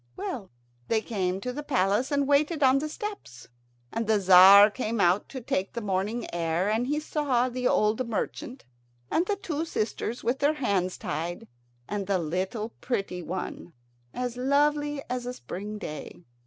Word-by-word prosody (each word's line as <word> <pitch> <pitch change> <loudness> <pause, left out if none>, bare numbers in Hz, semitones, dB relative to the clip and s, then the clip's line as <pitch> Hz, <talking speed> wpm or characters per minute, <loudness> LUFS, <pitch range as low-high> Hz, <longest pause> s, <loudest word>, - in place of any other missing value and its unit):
Well, 210 -7 -5 0.4
they 220 -1 +1
came 190 -5 -2
to 250 +3 -3
the 295 - -4
palace, 240 -2 +1
and 285 -1 +1
waited 295 +2 +2
on 265 +1 +5
the 305 +2 -3
steps; 400 - -7 0.4
and 230 -1 -2
the 220 -1 +4
Tzar 195 +2 +8
came 230 -1 -3
out 180 +2 +3
to 265 - -6
take 195 -4 -2
the 235 - -3
morning 210 +3 -2
air, 170 +3 0
and 230 +3 0
he 295 +2 0
saw 275 -5 0
the 250 0 -1
old 220 +3 +1
merchant, 245 +3 -4 0.5
and 345 +3 +1
the 410 - +1
two 325 -6 -3
sisters 235 -5 -3
with 250 +4 0
their 290 +2 +3
hands 195 -10 0
tied, 165 +4 -4 0.4
and 205 -2 -3
the 200 -1 +2
little 185 +7 -2
pretty, 195 -7 -2
one, 175 0 -6 0.4
as 250 -1 -4
lovely 290 +2 +1
as 250 0 -3
a 250 - -4
spring 210 -1 -6
day. 165 -2 -8
230 Hz, 170 wpm, -27 LUFS, 190-275 Hz, 0.5 s, Tzar